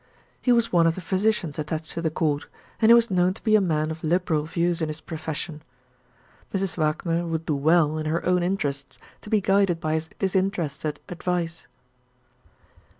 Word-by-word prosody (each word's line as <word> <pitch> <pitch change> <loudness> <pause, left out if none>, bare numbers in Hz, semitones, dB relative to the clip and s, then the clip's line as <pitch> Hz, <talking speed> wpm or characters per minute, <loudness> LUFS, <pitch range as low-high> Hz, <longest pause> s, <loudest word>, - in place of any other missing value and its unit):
He 250 - +2
was 235 -1 +3
one 170 -1 +5
of 165 - +1
the - - -5
physicians 190 -3 0
attached 155 +1 -4
to 165 - -4
the 165 - +1
Court, 150 -2 -1 0.3
and 220 - +5
he - - +10
was 235 -2 +3
known 180 0 +2
to - - -13
be 215 -2 +4
a 215 - +5
man 155 -4 0
of 160 0 -7
liberal 160 -2 +1
views 170 +1 0
in 160 - 0
his 155 0 -5
profession. 160 -1 -5 0.9
Mrs. 195 -3 -1
Wagner 165 +2 0
would 165 -1 -3
do 155 - 0
well, 155 +1 +3
in 155 - -3
her 160 +2 -1
own 180 0 +3
interests, 145 -7 -2 0.2
to - - -11
be 215 -1 +3
guided 195 -3 +2
by 155 -1 -1
his 160 +1 -2
disinterested 180 -6 -1
advice. 175 -1 -3
170 Hz, 185 wpm, -25 LUFS, 155-185 Hz, 0.9 s, he